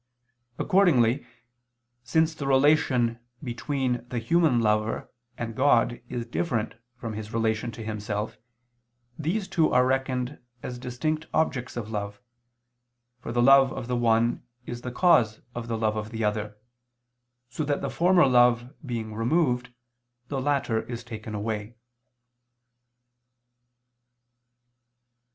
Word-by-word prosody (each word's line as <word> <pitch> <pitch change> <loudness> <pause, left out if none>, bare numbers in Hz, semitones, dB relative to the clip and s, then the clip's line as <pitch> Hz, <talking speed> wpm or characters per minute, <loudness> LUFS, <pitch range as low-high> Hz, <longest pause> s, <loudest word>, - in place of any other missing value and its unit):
Accordingly, 145 - +3 0.8
since 160 +4 +2
the 145 -3 -5
relation 130 -4 +3 0.2
between 125 0 -2
the 125 - -3
human 135 +2 +3
lover 110 0 0 0.3
and 115 -1 -4
God 120 -3 +3
is 120 -2 -3
different 120 -3 -2 0.2
from 115 -2 -6
his 105 0 -6
relation 115 +1 0
to 115 - -8
himself, 105 0 -4 0.8
these 190 +7 -1
two 160 -3 +2
are 125 0 +4
reckoned 130 0 -1 0.2
as 125 -1 -5
distinct 155 +6 -2
objects 130 -6 0
of 110 -2 -5
love, 100 -1 -4 1.0
for 125 - -6
the 120 0 +2
love 135 0 +7
of 120 - -6
the 125 - -1
one 115 0 +2 0.2
is 120 0 -6
the 125 - -5
cause 120 -8 +3
of 120 -1 -5
the 115 -1 -2
love 110 -1 0
of 105 0 -4
the 110 -1 -4
other, 105 0 -2 0.9
so 140 +5 -4
that 145 -1 -1
the 140 - -2
former 175 -1 +4
love 120 0 +4
being 115 -5 -4
removed 125 +1 +1 0.6
the 135 -2 -2
latter 135 -5 +1
is 120 -1 -7
taken 110 -2 -7
away. 105 +1 -4
120 Hz, 125 wpm, -26 LUFS, 110-135 Hz, 1.0 s, love